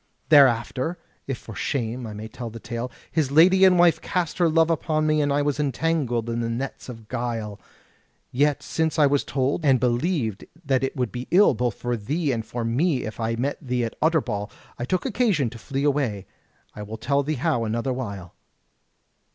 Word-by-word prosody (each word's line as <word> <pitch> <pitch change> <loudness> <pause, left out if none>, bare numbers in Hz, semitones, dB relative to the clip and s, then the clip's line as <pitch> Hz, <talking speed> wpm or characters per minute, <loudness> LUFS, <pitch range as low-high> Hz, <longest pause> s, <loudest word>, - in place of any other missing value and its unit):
Thereafter, 135 +2 +4 0.3
if 135 -3 -2
for 115 - -11
shame 120 +1 -3
I 110 - -7
may 110 +1 -6
tell 120 +1 -7
the 115 +1 -9
tale, 120 +2 -5 0.2
his 155 -4 +1
lady 180 +6 +6
and 185 -1 +6
wife 175 -1 +4
cast 180 -3 -2
her 170 -2 +4
love 165 +1 +3
upon 155 -1 0
me, 155 0 +2
and 145 -1 +1
I 145 +1 +2
was 145 0 -1
entangled 140 -5 0
in 115 0 -2
the 115 -1 -1
nets 130 +3 -5
of 115 -3 -10
guile: 115 -4 -4 0.7
yet 145 +3 +1
since 160 -1 -1
I 150 - +6
was 140 0 +2
told, 140 +4 -1
and 135 -4 +4
believed 120 - 0 0.2
that 135 -2 +1
it 135 - -2
would 125 -4 -1
be 125 0 -6
ill 195 -1 +5
both 120 -2 -1
for 120 0 -2
thee 145 +8 -1
and 115 -3 -2
for 120 +1 -4
me 130 +5 +1
if 110 - -7
I 115 0 -1
met 135 +5 -2
thee 125 -4 -1
at 115 - -6
Utterbol, 125 -10 0 0.3
I 120 - -2
took 185 +6 -1
occasion 180 - +1
to 115 - -10
flee 135 +3 -3
away, 135 -9 0 0.5
I 105 - -8
will 105 +2 -6
tell 140 +5 +1
thee 150 +2 -2
how 120 -2 0
another 115 +4 -1
while." 100 -8 -6
130 Hz, 200 wpm, -24 LUFS, 115-155 Hz, 0.7 s, lady